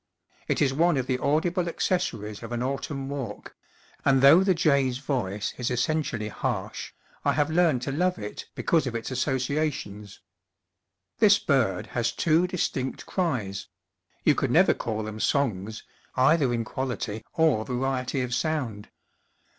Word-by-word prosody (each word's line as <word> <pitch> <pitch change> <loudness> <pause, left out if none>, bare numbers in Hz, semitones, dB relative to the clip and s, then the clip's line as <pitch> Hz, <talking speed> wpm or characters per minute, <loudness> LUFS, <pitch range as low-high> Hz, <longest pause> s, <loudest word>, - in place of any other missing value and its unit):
It - - +2
is 135 -2 +2
one 165 +2 +3
of 130 - 0
trie 130 -1 0
audible 170 +5 +1
acces 175 +1 0
sories 105 0 -8
of 115 0 -8
an 120 0 -2
autumn 135 +1 -3
walk; 135 -7 -6 0.5
and 135 -1 +3
though 160 +7 +8
the 190 -2 +3
jay's 140 -6 +2
voice 120 -8 -2
is 125 +1 -1
essentially 125 -3 -1
harsh, - - -4 0.3
I - - +2
have 150 +1 +1
learned 160 -7 +3
to 140 - -2
love 180 +5 +1
it 105 0 -7
because 160 -5 +1
of 120 - -4
its 115 +3 -4
associations. 130 -5 -2 1.0
This 205 -2 +6
bird 130 - +1
has 115 -1 +1
two 165 +6 +2
distinct 140 -7 -2
cries 120 - -2 0.6
you - - +5
could - - -1
never - - +5
call 110 -1 -3
them 110 0 -6
songs, 110 -6 0 0.3
either 135 +1 +4
in 115 -1 -1
quality 120 -4 -4
or 160 -10 +3
variety 130 +1 -1
of 125 -1 -3
sound. 125 -8 -2
130 Hz, 150 wpm, -26 LUFS, 115-155 Hz, 1.0 s, though